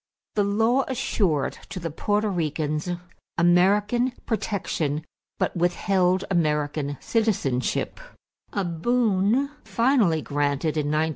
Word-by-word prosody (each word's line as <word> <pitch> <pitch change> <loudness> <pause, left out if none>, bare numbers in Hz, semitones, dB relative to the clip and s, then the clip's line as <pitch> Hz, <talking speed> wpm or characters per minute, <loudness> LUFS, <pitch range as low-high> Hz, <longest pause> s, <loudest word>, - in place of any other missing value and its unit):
The 205 - +2
law 225 +6 +2
assured 190 - 0
to - - -5
the 170 -2 -4
Porto 205 +6 0
Ricans 155 -3 -1 0.5
American 205 +8 +3
protection 165 -9 -2 0.3
but - - -1
withheld 180 +2 +1
American 150 -4 0
citizenship 200 - 0 0.5
a 200 -2 -1
boon 220 - +1
finally 230 - +2
granted 145 +1 0
in 150 -2 0
1917. 155 +2 +1
180 Hz, 100 wpm, -25 LUFS, 155-210 Hz, 0.5 s, American